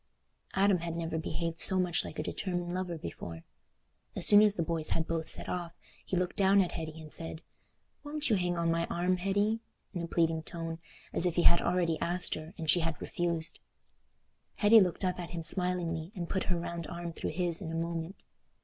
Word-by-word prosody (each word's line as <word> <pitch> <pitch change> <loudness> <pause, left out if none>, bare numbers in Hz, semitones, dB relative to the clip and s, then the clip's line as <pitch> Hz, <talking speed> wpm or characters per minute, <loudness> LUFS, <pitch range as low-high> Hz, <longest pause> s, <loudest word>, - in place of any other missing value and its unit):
Adam 195 -1 +4
had 165 0 -4
never 165 -1 -2
behaved 165 +1 -3
so 190 - +5
much 180 -2 +1
like - - -8
a - - -2
determined 175 -2 -3
lover 180 -2 -3
before. 85 - -7 0.7
As - - -1
soon 205 0 +8
as 210 -1 +4
the 170 - 0
boys 160 -1 -1
had 160 - 0
both 165 -1 -2
set - - -1
off, 175 -2 -4 0.3
he 185 - -2
looked 180 0 -1
down 195 0 +4
at 185 -3 +2
Hetty 160 -1 -6
and 155 -1 -6
said, 165 0 -5 0.6
"Won't 300 +1 +2
you 225 - +3
hang 175 -2 0
on 170 0 +1
my 170 0 0
arm, 180 +1 0
Hetty?" 205 +4 +1 0.3
in 175 - -3
a 170 - -4
pleading 165 -1 +1
tone, 165 0 -6 0.3
as 180 - +8
if 175 - -1
he 175 - +2
had 170 - +6
already 170 -3 +1
asked 175 +1 0
her 155 +4 -7
and 165 -3 -5
she 165 +4 +5
had 165 -2 -2
refused. 170 -2 -2 1.0
Hetty 220 +2 +7
looked 185 -1 +1
up 180 0 -1
at 175 - -5
him 170 -2 -5
smilingly 170 -1 0
and 175 -3 -4
put 190 - -1
her 180 - 0
round 170 -1 -5
arm 170 -1 -6
through - - -4
his 175 0 +1
in 165 -4 -5
a - - -4
moment. 165 +2 -4
170 Hz, 210 wpm, -31 LUFS, 165-180 Hz, 1.0 s, soon